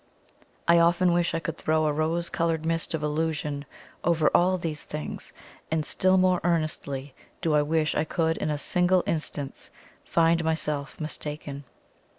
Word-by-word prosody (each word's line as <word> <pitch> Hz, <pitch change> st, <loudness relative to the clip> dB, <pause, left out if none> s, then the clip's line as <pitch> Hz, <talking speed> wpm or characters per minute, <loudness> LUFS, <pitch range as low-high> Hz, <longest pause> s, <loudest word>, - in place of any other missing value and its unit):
I 170 Hz, 0 st, +6 dB
often 175 Hz, +1 st, +4 dB
wish 175 Hz, -1 st, +1 dB
I -, -, +1 dB
could 165 Hz, 0 st, -5 dB
throw 155 Hz, 0 st, +2 dB
a 150 Hz, -, +2 dB
rose 160 Hz, +3 st, 0 dB
coloured 165 Hz, -1 st, 0 dB
mist 165 Hz, 0 st, 0 dB
of 155 Hz, -, -4 dB
illusion 150 Hz, -1 st, -1 dB, 0.4 s
over 165 Hz, -3 st, +3 dB
all 185 Hz, +1 st, +4 dB
these 160 Hz, -4 st, -4 dB
things 150 Hz, 0 st, -6 dB, 0.4 s
and 160 Hz, -1 st, 0 dB
still 185 Hz, +4 st, +2 dB
more 185 Hz, -1 st, +3 dB
earnestly 155 Hz, -5 st, -1 dB, 0.3 s
do 160 Hz, -, 0 dB
I 150 Hz, -, +5 dB
wish 155 Hz, +1 st, +1 dB
I -, -, +1 dB
could 160 Hz, +1 st, 0 dB
in 155 Hz, -, -2 dB
a 150 Hz, -, 0 dB
single 180 Hz, +4 st, +2 dB
instance 150 Hz, -3 st, -3 dB, 0.3 s
find 165 Hz, 0 st, +3 dB
myself 150 Hz, -3 st, -2 dB
mistaken. 150 Hz, -2 st, -6 dB
160 Hz, 160 wpm, -27 LUFS, 150-170 Hz, 0.4 s, I